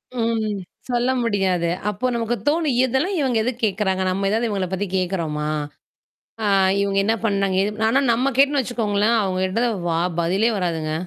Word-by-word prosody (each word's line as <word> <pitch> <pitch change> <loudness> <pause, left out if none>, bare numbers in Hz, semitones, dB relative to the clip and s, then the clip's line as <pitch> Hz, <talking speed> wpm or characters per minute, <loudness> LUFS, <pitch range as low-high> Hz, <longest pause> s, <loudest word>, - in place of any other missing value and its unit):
ம். 225 -3 -1 0.3
சொல்ல 245 +1 +1
முடியாது. 190 -6 0 0.2
அப்போ 210 +6 -1
நமக்கு 235 +1 -1
தோணும். 300 -3 +2
"இதெல்லாம் 265 +10 0
இவுங்க 260 -5 +1
எதுக்கு 245 +1 -3
கேட்கிறாங்க? 190 -2 0
நம்ம 195 +2 -1
ஏதாவது 225 +3 +1
இவுங்கள 195 -3 -1
பத்தி 195 +2 -1
கேட்கிறோமா? 165 -5 -2 1.0
ஆ - - +1 0.3
இவுங்க 200 0 0
என்ன 220 +2 +2
பண்ணாங்க? 195 -3 +1
ஏது" 210 +2 -3
ஆனா 265 +4 +3
நம்ம 250 +4 +1
கேட்டோன்னு 280 +1 +4
வச்சுக்கோங்களேன், 225 -2 0
அவுங்க 185 -2 -1
கிட்ட 230 +6 0 0.2
வா 165 - +1 0.2
பதிலே 190 +7 +2
வராதுங்க. 165 -4 -2
210 Hz, 155 wpm, -22 LUFS, 190-240 Hz, 1.0 s, கேட்டோன்னு